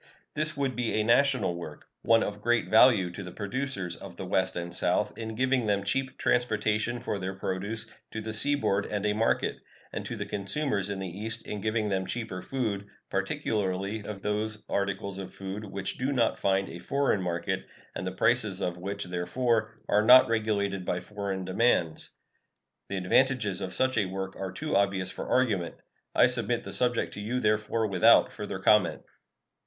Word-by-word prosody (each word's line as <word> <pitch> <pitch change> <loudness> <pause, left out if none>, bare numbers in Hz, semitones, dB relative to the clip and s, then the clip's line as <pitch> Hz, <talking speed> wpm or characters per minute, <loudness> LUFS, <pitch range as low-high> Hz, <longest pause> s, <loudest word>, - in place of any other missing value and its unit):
This 155 0 -1
would 135 -2 0
be 120 -2 -1
a 110 - +2
national 120 -4 +3
work; 80 -3 -8 0.2
one 115 0 +4
of 105 0 -4
great 120 +1 +1
value 110 -5 +6
to 90 - -7
the 90 -1 -7
producers 100 -3 -3
of 90 -1 -10
the 95 - -6
West 95 0 0
and 85 0 -4
South - - +1
in 110 -1 -5
giving 130 -1 +1
them 100 -1 +1
cheap 130 +6 -1
transportation 110 0 +1
for 105 - -3
their 95 +1 -4
produce 100 +4 -3 0.2
to 110 - -5
the 110 0 -5
seaboard 110 -5 +2
and 105 -1 -2
a 105 - +2
market, 110 +2 +1 0.4
and - - -3
to - - -4
the - - -4
consumers 100 +1 -1
in 100 - -3
the 95 0 -4
East 115 +2 -5
in 105 - -5
giving 110 0 0
them 95 -1 -1
cheaper 110 -6 -4
food, 105 -4 -2 0.2
particularly 100 +1 -1
of 100 -2 -7
those 105 +1 -1
articles 100 -1 -2
of 95 -1 -8
food 100 +2 -6
which 95 -1 -4
do 130 +2 0
not 120 -5 +1
find 95 0 +1
a 85 - -8
foreign 135 +1 +1
market, 85 -1 -2 0.3
and 95 - -4
the - - -2
prices 110 -1 +1
of 90 -3 -2
which, 100 +3 -4
therefore, 110 +6 0 0.2
are 105 - +4
not 125 +3 +9
regulated 100 -4 0
by 90 0 -1
foreign 100 -1 -4
demands. 95 -5 +1 0.8
The 95 - -2
advantages 105 0 +2
of 95 -1 -3
such 130 0 +2
a 100 - +2
work 95 +1 -5
are 95 -1 -4
too 95 - -3
obvious 95 -2 +1
for - - -6
argument. 110 -9 +1 0.4
I - - +7
submit 120 -1 0
the - - -7
subject 120 -1 +1
to 105 - -6
you, 120 +5 -1
therefore, 110 0 +1
without 110 +3 +5
further 105 -2 -5
comment. 95 0 +3
105 Hz, 180 wpm, -28 LUFS, 95-115 Hz, 0.8 s, not